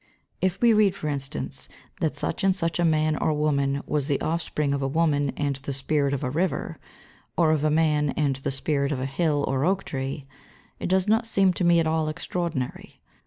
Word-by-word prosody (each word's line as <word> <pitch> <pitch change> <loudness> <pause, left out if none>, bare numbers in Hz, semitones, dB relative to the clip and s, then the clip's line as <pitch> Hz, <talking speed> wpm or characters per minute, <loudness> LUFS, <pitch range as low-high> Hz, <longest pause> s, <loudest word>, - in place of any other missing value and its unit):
If 185 +1 0
we 235 -1 +6
read, 210 -3 +4
for 150 - -4
instance, 140 -2 -4 0.3
that 160 - 0
such - - -2
and 190 -1 +3
such 165 -2 -1
a - - +3
man 155 -1 +2
or 155 - +1
woman 140 -2 0
was 145 -2 -1
the 140 -3 +1
offspring 155 -3 -1
of 140 - -1
a 135 - 0
woman 145 -1 +1
and 140 -2 -1
the 135 +1 -6
spirit 140 +1 0
of 140 - -2
a 125 - 0
river, 175 +6 -2 0.6
or 165 -3 +4
of 155 -2 +1
a 155 - +3
man 150 -1 +2
and 145 -4 +1
the 135 - -3
spirit 140 +1 0
of 140 - -1
a 130 - -2
hill 145 +1 0
or 135 0 0
oak 195 +3 +1
tree, 135 +1 -4 0.5
it - - -3
does 185 +1 +2
not 225 +2 +2
seem 195 -4 +3
to 180 - -2
me 170 -1 +5
at 165 - +2
all 160 -1 +1
extraordinary. 160 -4 -4
155 Hz, 215 wpm, -25 LUFS, 140-170 Hz, 0.6 s, we